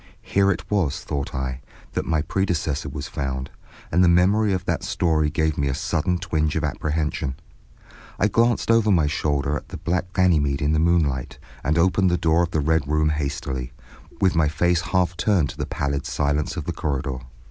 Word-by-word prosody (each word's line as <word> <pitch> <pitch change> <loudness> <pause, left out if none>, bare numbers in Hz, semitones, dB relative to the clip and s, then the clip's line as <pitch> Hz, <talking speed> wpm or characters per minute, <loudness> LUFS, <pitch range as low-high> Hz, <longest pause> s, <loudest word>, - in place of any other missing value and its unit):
Here 100 0 +2
it - - -1
was, 90 -9 0
thought 70 -1 -4
I, 65 0 -3 0.3
that - - -2
my 80 -2 +1
predecessor 80 -5 -1
was 70 +1 -5
found, 65 -1 -4 0.4
and 90 +4 +4
the - - +5
memory 100 +5 +4
of 95 -1 -1
that 85 -1 -1
story 85 -5 +1
gave 80 0 0
me 70 - +1
a 65 - -1
sudden 90 0 0
twinge 80 -3 -1
of - - -1
apprehension. 75 -3 -2 0.8
I 105 - +3
glanced 115 +2 +2
over 115 -2 +4
my 85 -6 +4
shoulder 75 -1 0
at - - -6
the - - -6
black 90 +1 -2
Ganymede 75 -7 +2
in 75 0 +1
the 80 - +2
moonlight, 80 -6 +1 0.3
and 75 +2 +1
opened 95 +2 +3
the 90 - +1
door 85 0 +2
of 85 - 0
the 80 -3 0
Red 80 -1 +1
Room 75 +1 +2
rather 75 0 -1
hastily, 65 -3 -3 0.5
with 95 -2 +2
my 80 -2 +3
face 85 +3 +1
half 90 0 0
turned 90 - +2
to - - -14
the - - -3
pallid 70 0 -2
silence 75 0 -1
of - - -2
the - - -3
corridor. 70 -3 -2
80 Hz, 195 wpm, -23 LUFS, 70-90 Hz, 0.8 s, the